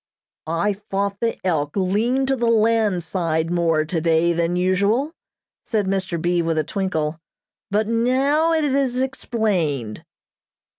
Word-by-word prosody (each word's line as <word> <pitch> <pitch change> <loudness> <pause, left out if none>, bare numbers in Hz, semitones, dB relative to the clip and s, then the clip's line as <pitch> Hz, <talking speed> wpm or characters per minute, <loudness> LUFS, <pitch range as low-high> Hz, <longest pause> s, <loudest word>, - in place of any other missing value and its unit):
"I 170 +6 0
thought 200 0 -3
the 230 -1 -1
'Elk' 150 -5 0
leaned 225 +8 +1
to 270 - +3
the 240 -2 -1
land 220 -5 +2
side 165 -1 -1
more 165 -3 +1
today 165 +1 +1
than 170 +1 0
usual," 200 - +1 0.5
said 215 -3 -1
Mr. 190 -3 -1
B. 175 +1 +1
with 165 -1 -1
a 155 - +2
twinkle, 160 -3 -2 0.5
"but 210 +1 +1
now 265 +8 +2
it 320 -1 +2
is 265 -3 0
explained." 195 - -1
195 Hz, 135 wpm, -22 LUFS, 165-230 Hz, 0.5 s, to